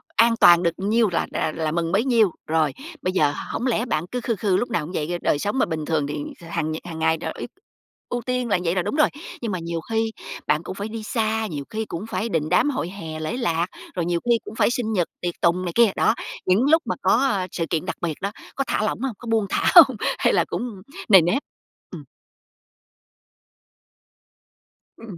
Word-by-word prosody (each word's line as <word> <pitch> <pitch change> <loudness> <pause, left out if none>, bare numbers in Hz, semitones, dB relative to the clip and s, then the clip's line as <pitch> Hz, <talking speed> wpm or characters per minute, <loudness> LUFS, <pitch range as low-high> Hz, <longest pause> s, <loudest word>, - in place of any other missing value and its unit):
an 230 0 +5
toàn 175 0 +8
được 170 -1 +2
nhiêu 215 +3 +2
là 170 - 0
rà 160 - 0
là 160 -2 -1
mừng 165 0 -1
bấy 205 +6 +2
nhiêu. 230 -7 +4 0.2
Rồi, 155 -2 +1 0.3
bây 185 - -1
giờ 150 -6 +3 0.2
hổng 245 - -1
lẽ 235 -1 +1
bạn 160 -9 -1
cứ 250 - -2
khư 230 -1 -1
khư 195 -2 +1
lúc 245 - -1
nào 170 -9 0
cũng 165 - -8
vậy? 150 -4 -1
Do 175 +1 -2
đời 145 - +1
sống 205 - -1
mà - - +4
bình 155 -1 -4
thường 155 -3 0
thì 145 - -4 0.2
kh - - -16
hàng 155 -2 -1
nh - - -2
hàng 165 -2 -7
ngày 160 0 +2
tr - - -5
ý - - -4 0.6
ưu 245 - -2
tiên 250 0 -2
là 200 - +2
vậy 170 +1 0
là 185 - +2
đúng 175 - -3
rồi, 305 -1 +4 0.3
nhưng 230 -3 -2
mà 185 - -2
nhiều 170 0 -3
khi 225 0 +1 0.4
bạn 150 +2 +2
cũng 185 - -6
phải 200 +2 -4
đi 220 0 -6
xa, 220 -1 0
nhiều 150 -7 -5
khi 220 0 -3
cũng 175 0 -6
phải 210 +4 -2
đình 155 -5 -1
đám 180 - +3
hội 255 - -2
hè, 165 -5 -7
lễ 155 +10 -3
lạc, 170 -9 0 0.3
rồi 175 -2 -1
nhiều 170 0 0
khi 235 -1 +3
cũng 220 - -8
phải - - +3
sinh 235 -3 -1
nhật, 180 -5 +1
tiệc 175 -1 -2
tùng 175 +2 +2
này 175 - -2
kia. 235 -3 +5
Đó, 220 - +3 0.3
những 185 +6 +3
lúc 320 +1 +6
mà - - -1
có, - - +4
a, 220 -8 +1
sự 165 - -2
kiện 165 +1 -1
đặc 185 - -3
biệt 165 -4 -2
đó, 200 +1 -2 0.2
có 275 - 0
thả 215 - 0
lỏng 215 - -1
hông? 265 -2 -1
Có 240 - -10
buông 220 -2 +2
thả - - +2
hông? 275 -9 +9 0.2
Hay - - +3
là - - +3
cũng 230 -6 -5 0.3
nề 190 -4 +9
nếp? 175 - +1 0.5
Ừm. - - -8 2.9
Ừm. 215 -6 -10
190 Hz, 240 wpm, -23 LUFS, 170-230 Hz, 2.9 s, hông